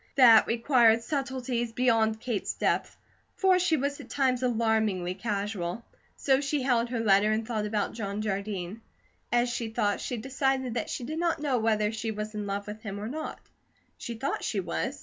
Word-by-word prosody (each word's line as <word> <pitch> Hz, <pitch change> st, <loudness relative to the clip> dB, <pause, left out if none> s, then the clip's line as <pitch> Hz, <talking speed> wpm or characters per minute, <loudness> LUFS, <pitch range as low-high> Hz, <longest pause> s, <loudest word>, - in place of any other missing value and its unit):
That 235 Hz, -5 st, +8 dB
required 230 Hz, -1 st, +4 dB
subtleties 255 Hz, -4 st, -2 dB
beyond 225 Hz, -3 st, +2 dB
Kate's 230 Hz, -4 st, -2 dB
depth, -, -, 0 dB, 0.4 s
for 375 Hz, -1 st, +4 dB
she 345 Hz, -3 st, +2 dB
was 280 Hz, +1 st, -2 dB
at -, -, -11 dB
times 260 Hz, -3 st, +1 dB
alarmingly 220 Hz, -7 st, +1 dB
casual. 200 Hz, 0 st, -3 dB, 0.3 s
So 270 Hz, -1 st, +2 dB
she 285 Hz, -1 st, -1 dB
held 240 Hz, -2 st, +2 dB
her 240 Hz, -1 st, -2 dB
letter 205 Hz, 0 st, +4 dB
and 220 Hz, +1 st, -1 dB
thought 215 Hz, -3 st, -1 dB
about 210 Hz, -1 st, -1 dB
John 205 Hz, -2 st, -4 dB
Jardine. 200 Hz, 0 st, -3 dB, 0.5 s
As 240 Hz, +1 st, +3 dB
she 240 Hz, -1 st, -3 dB
thought, 205 Hz, -2 st, 0 dB
she 245 Hz, -, -3 dB
decided 265 Hz, +1 st, -1 dB
that 240 Hz, -, -3 dB
she -, -, -4 dB
did 310 Hz, +6 st, -4 dB
not 340 Hz, -1 st, +1 dB
know 280 Hz, -5 st, 0 dB
whether 215 Hz, -1 st, +1 dB
she 225 Hz, 0 st, -4 dB
was 215 Hz, 0 st, -4 dB
in 210 Hz, -1 st, -4 dB
love 200 Hz, 0 st, -3 dB
with 210 Hz, +1 st, -8 dB
him 205 Hz, -2 st, -5 dB
or 210 Hz, -, -4 dB
not; 310 Hz, +4 st, -5 dB, 0.5 s
she 235 Hz, -, -6 dB
thought 270 Hz, +5 st, -3 dB
she 205 Hz, -, -1 dB
was. 80 Hz, -, -3 dB
230 Hz, 185 wpm, -28 LUFS, 210-255 Hz, 0.5 s, That